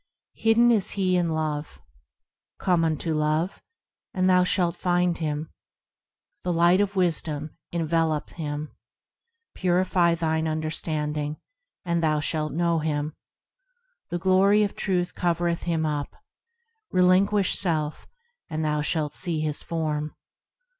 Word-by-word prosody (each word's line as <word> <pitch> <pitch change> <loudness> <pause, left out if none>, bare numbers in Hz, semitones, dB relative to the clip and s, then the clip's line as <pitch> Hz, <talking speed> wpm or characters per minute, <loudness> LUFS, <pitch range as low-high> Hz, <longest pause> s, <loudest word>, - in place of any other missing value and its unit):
Hidden 230 +2 +4
is 210 -5 +2
He 185 -2 +1
in 175 -2 +1
Love; 155 -2 -3 0.8
Come 175 -4 +2
unto 160 0 0
Love, 155 +4 0 0.5
and 185 0 +2
thou 180 -1 +5
shalt 180 -2 +1
find 175 -1 +1
Him. 155 -1 -3 0.9
The 180 - -1
Light 175 +3 +4
of 200 0 -1
Wisdom 160 -4 -1 0.2
envelopeth 165 -2 0
Him; 150 -2 -5 0.8
Purify 180 -1 +2
thine 160 -1 0
understanding, 155 -1 -2 0.5
and 170 -1 0
thou 155 -2 +2
shalt 155 0 -1
know 170 0 +1
Him. 150 -1 -2 1.0
The 175 - -2
glory 190 +4 +4
of 200 - -2
Truth 180 -2 -1
covereth 170 -1 -1
Him 160 -2 +1
up; 145 -2 -3 0.8
Relinguish 185 +2 +3
self, 155 -5 -1 0.4
and 155 0 -2
thou 150 0 0
shalt 150 -1 -1
see 170 -4 -1
His 150 -1 -1
Form. 155 -2 -3
165 Hz, 120 wpm, -25 LUFS, 155-180 Hz, 1.0 s, thou